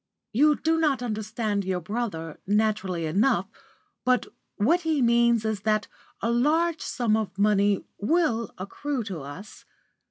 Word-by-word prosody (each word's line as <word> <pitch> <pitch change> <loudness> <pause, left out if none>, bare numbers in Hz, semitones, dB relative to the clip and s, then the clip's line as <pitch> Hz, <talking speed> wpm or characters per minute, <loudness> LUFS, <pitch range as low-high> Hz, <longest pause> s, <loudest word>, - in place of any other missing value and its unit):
"You 295 +6 +5
do 325 +2 +1
not 285 -6 +1
understand 215 -2 -2
your 185 -1 -1
brother, 175 -5 -4
naturally 200 -5 +1
enough, 195 +4 +2 0.6
but 255 0 +2 0.3
what 315 +13 +2
he 320 -3 0
means 235 -2 +3
is 220 -2 -1
that 215 0 +1 0.3
a 230 - 0
large 310 +7 +2
sum 235 -4 0
of 215 -3 -3
money 205 -1 +2
will 230 - +1
accrue 250 +7 -3
to 195 -6 -5
us. 145 +10 -10
220 Hz, 135 wpm, -26 LUFS, 200-255 Hz, 0.6 s, You